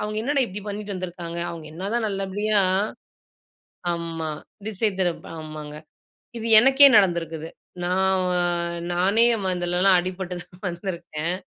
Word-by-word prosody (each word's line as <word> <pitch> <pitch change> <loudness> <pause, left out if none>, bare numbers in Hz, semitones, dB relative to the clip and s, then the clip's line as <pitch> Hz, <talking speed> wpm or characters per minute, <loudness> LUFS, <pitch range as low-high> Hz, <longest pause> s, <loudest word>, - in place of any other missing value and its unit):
அவங்க 210 0 -3
என்னடா 275 +1 +2
இப்படி 205 +1 -7
பண்ணிட்டு 205 0 -4
வந்துருக்காங்க. 175 -2 -6
அவங்க 165 -2 -8
என்னதான் 210 +7 -2
நல்லபடியா 200 +2 0 1.3
ஆமா. 165 -2 -4 0.4
திசை 215 0 0
திருப்ப 175 -3 -1
ஆமாங்க. 155 -1 -8 0.6
இது 225 - -5
எனக்கே 270 +4 +8
நடந்திருக்கிது. 165 -4 +1 0.4
நான் 190 +1 +2
வ - - 0 0.6
நானே 195 +6 +3 0.2
ம 185 -1 0
இதிலலாம் 180 +1 +3
அடிபட்டு 185 0 -5
தான் 185 +3 -17
வந்திருக்கேன். 170 -2 -4
185 Hz, 120 wpm, -24 LUFS, 170-205 Hz, 1.3 s, எனக்கே